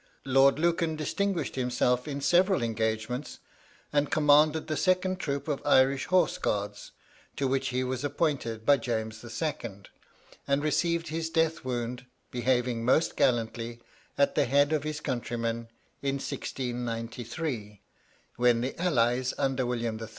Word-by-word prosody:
Lord 135 +1 +5
Lucan 170 0 +1
distinguished 190 +4 -1
himself 125 0 +1
in 140 -1 -4
several 180 +1 +3
engagements, 110 +3 -2 0.6
and 145 -1 +2
commanded 150 +1 +4
the 155 - -2
second 185 +2 +1
troop 140 -1 -3
of 145 -3 -1
Irish 135 +1 +3
Horse 185 0 +2
Guards, 100 0 -2 0.4
to 140 - 0
which 135 0 0
he 130 +1 -1
was 130 +1 -3
appointed 140 -7 -1
by 145 -1 +6
James 110 -3 -3
II., 120 -5 -4 0.6
and 140 +1 +1
received 170 +2 0
his 160 +1 -2
death 165 0 +1
wound, 125 0 -4 0.2
behaving 120 -1 0
most 130 +7 +2
gallantly 115 -1 0 0.4
at 140 - +3
the - - +2
head 140 +4 +3
of 155 - +1
his 155 0 -4
countrymen, 115 -2 -3 0.3
in 140 0 0
1693, 120 -3 -4 0.6
when 120 -1 +3
the 130 +6 -4
allies, 125 -6 +1
under 130 -2 0
William 115 -2 -2
III. 110 - -6
130 Hz, 135 wpm, -28 LUFS, 120-150 Hz, 0.6 s, by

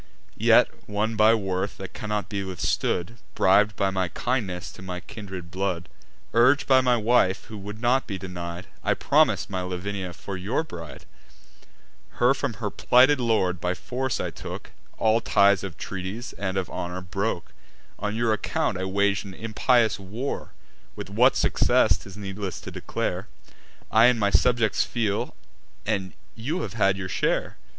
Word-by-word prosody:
Yet, - - +3
won 105 +2 -1
by 110 +2 +6
worth 95 -2 -2
that 95 - -8
cannot 105 -1 -3
be 100 -2 -3
withstood, 95 +2 -1 0.2
Brib'd 105 +2 +4
by 95 -2 +1
my 95 -1 0
kindness 95 -5 -2
to - - -13
my 90 -1 -5
kindred 95 -4 -8
blood, 95 -2 -2 0.5
Urg'd 130 +5 +5
by 130 -1 +5
my 125 -1 +3
wife, 110 -4 +2
who 110 - -9
would 105 +2 -7
not 125 +2 +2
be 100 - -3
denied, 90 -1 -6 0.2
I - - +2
promis'd - - +2
my 95 -1 -1
Lavinia 90 0 -4
for 95 +4 -7
your 105 - -1
bride: 85 - -9 1.1
Her 125 +2 +4
from 140 -3 -2
her 105 -1 -3
plighted 130 +3 +5
lord 100 -7 +1
by 90 0 0
force 130 +5 -3
I - - -2
took; - - -8 0.3
All 110 +1 +3
ties 100 -3 +4
of 95 -5 -6
treaties, 100 +5 -5
and 95 -1 -3
of 95 - -1
honour, 90 +1 -5
broke: 95 0 -3 0.5
On 105 +1 -2
your 115 -1 +2
account 100 - -1
I 95 - -2
wag'd 100 +1 +1
an 95 -2 -9
impious 115 0 +2
war— 110 +8 -5 0.4
With - - -7
what - - +4
success, - - +3
'tis 95 +1 -12
needless 100 -1 -5
to - - -8
declare; - - -3 0.6
I 110 +1 +6
and 125 -2 +3
my 100 -1 +2
subjects 115 +3 +3
feel, 105 -4 -2 0.5
and 95 -4 -1 0.2
you 150 +11 -3
have - - -5
had 100 -3 +2
your 95 -1 -4
share. - - 0
100 Hz, 160 wpm, -25 LUFS, 95-115 Hz, 1.1 s, by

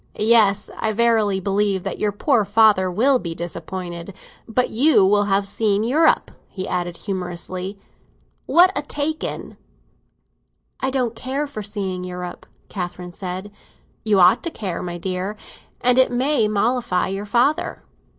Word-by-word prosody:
"Yes, 215 -2 +3
I 220 -1 0
verily 220 -3 +2
believe 195 0 0
that - - -4
your 210 - +1
poor 225 +3 +2
father 205 -2 +4
will 250 +8 +3
be 170 -5 -5
disappointed! 175 +1 -6 0.3
But 250 +2 0
you 255 -3 +5
will 205 +1 +3
have 195 0 +1
seen 205 0 +1
Europe," 305 +8 +2 0.2
he 185 -1 -5
added 175 -1 -3
humorously. 185 0 -5 0.7
"What 365 +3 +5
a - - +1
take 300 +2 -3
in!" - - -5 1.2
"I 265 - 0
don't 250 -4 -1
care 270 +5 -3
for 275 -7 -7
seeing 195 -3 -4
Europe," 180 -1 -7 0.2
Catherine 180 -2 -6
said. 185 +3 -6 0.5
"You 210 -3 +3
ought 180 0 +6
to 340 - -3
care, 195 - -5
my 175 -1 -5
dear. 185 +3 -3 0.4
And 250 +1 +4
it 260 - +4
may 250 -2 +2
mollify 215 -2 0
your 195 +2 -4
father." 245 +8 +1
205 Hz, 145 wpm, -21 LUFS, 185-240 Hz, 1.2 s, ought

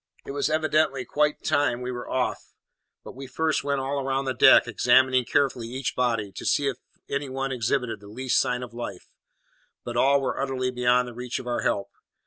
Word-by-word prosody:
It - - -6
was 140 +2 -1
evidently 155 -3 +1
quite 150 0 0
time 145 -5 +1
we 125 0 -4
were 120 -1 -6
off; 130 -1 -2 0.5
but - - -10
we 135 +1 -8
first 155 +4 0
went 140 -1 0
all 140 +1 -2
round 135 0 -1
the 130 - 0
deck, 120 - +6
examining 130 +2 +3
carefully 125 -2 0
each 130 +2 -4
body, 115 -5 0
to - - -6
see 145 - +1
if 135 -3 -1 0.3
any 140 0 -3
one 135 +1 -3
exhibited 120 -2 -1
the 100 - -14
least 125 +5 0
sign 125 0 -1
of 120 -1 -9
life; 120 0 -7 0.7
but 120 - -6
all 140 +3 +4
were 135 0 -2
utterly 130 -2 -1
beyond 125 0 +2
the 120 - -8
reach 125 +1 -4
of - - -7
our 120 -1 -1
help. 100 - -1
130 Hz, 200 wpm, -25 LUFS, 125-140 Hz, 0.7 s, deck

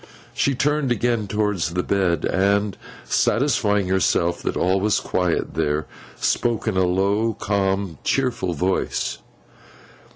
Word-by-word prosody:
She 140 - +1
turned 145 0 +1
again 120 -3 0
towards 105 -5 -1
the 90 - 0
bed, 90 -5 +1
and 100 +1 +1 0.3
satisfying 110 -7 +1
herself 85 -2 +1
that - - -2
all 95 +2 +2
was 105 +1 +2
quiet 90 -2 -1
there, 75 0 0 0.3
spoke 120 -1 0
in 110 - 0
a 95 -1 +3
low, 100 +5 +1
calm, 95 -4 -1
cheerful 120 -9 0
voice. 95 +5 -1
100 Hz, 125 wpm, -22 LUFS, 90-110 Hz, 0.3 s, a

